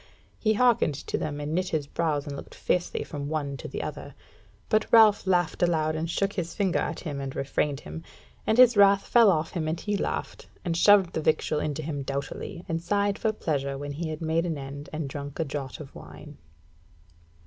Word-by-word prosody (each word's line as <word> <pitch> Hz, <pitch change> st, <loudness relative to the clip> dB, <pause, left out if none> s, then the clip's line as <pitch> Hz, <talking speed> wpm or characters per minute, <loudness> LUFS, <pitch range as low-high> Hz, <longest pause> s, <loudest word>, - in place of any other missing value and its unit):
He 215 Hz, -1 st, +2 dB
hearkened 230 Hz, -, +3 dB
to -, -, -5 dB
them, 145 Hz, -1 st, -3 dB
and 145 Hz, +1 st, -3 dB
knit 185 Hz, +2 st, 0 dB
his 155 Hz, -3 st, -1 dB
brows 150 Hz, -1 st, -1 dB
and 145 Hz, -2 st, -5 dB
looked -, -, -10 dB
fiercely 180 Hz, -, -1 dB
from 145 Hz, -2 st, -6 dB
one 145 Hz, -3 st, -2 dB
to -, -, -7 dB
the -, -, -5 dB
other. -, -, -7 dB, 0.5 s
But 215 Hz, 0 st, +1 dB
Ralph 215 Hz, -4 st, +6 dB
laughed 175 Hz, -3 st, +1 dB
aloud, 160 Hz, -3 st, +2 dB
and 160 Hz, +1 st, -2 dB
shook 195 Hz, +3 st, 0 dB
his 170 Hz, -3 st, -4 dB
finger 190 Hz, -4 st, +1 dB
at -, -, -3 dB
him 145 Hz, -5 st, -4 dB
and 135 Hz, -1 st, -5 dB
refrained 140 Hz, +1 st, -1 dB
him, 165 Hz, -, -8 dB, 0.5 s
and 220 Hz, -, +3 dB
his 250 Hz, -1 st, +7 dB
wrath 200 Hz, -1 st, +4 dB
ran 235 Hz, -2 st, +8 dB
off 160 Hz, -4 st, +2 dB
him 160 Hz, -3 st, -2 dB
and 160 Hz, +2 st, -2 dB
he 205 Hz, -1 st, -2 dB
laughed, 200 Hz, -, -3 dB, 0.2 s
and 170 Hz, -2 st, 0 dB
shoved 190 Hz, 0 st, +5 dB
the 160 Hz, -, -1 dB
victual 155 Hz, 0 st, +1 dB
into 150 Hz, 0 st, -3 dB
him 145 Hz, -2 st, -3 dB
doughtily, 140 Hz, +5 st, -5 dB
and 165 Hz, 0 st, -2 dB
sighed 200 Hz, +3 st, 0 dB
for 220 Hz, -, +1 dB
pleasure 140 Hz, -9 st, -2 dB
when 145 Hz, +1 st, -5 dB
he 160 Hz, +3 st, -4 dB
had 155 Hz, 0 st, -5 dB
made 165 Hz, +2 st, +1 dB
an 160 Hz, -3 st, -2 dB
end 140 Hz, +1 st, -8 dB
and 155 Hz, -2 st, -3 dB
drunk 140 Hz, +1 st, -7 dB
a 165 Hz, -, +1 dB
draught 140 Hz, -2 st, -5 dB
of 145 Hz, -3 st, -10 dB
wine. -, -, -12 dB
160 Hz, 210 wpm, -27 LUFS, 145-190 Hz, 0.5 s, ran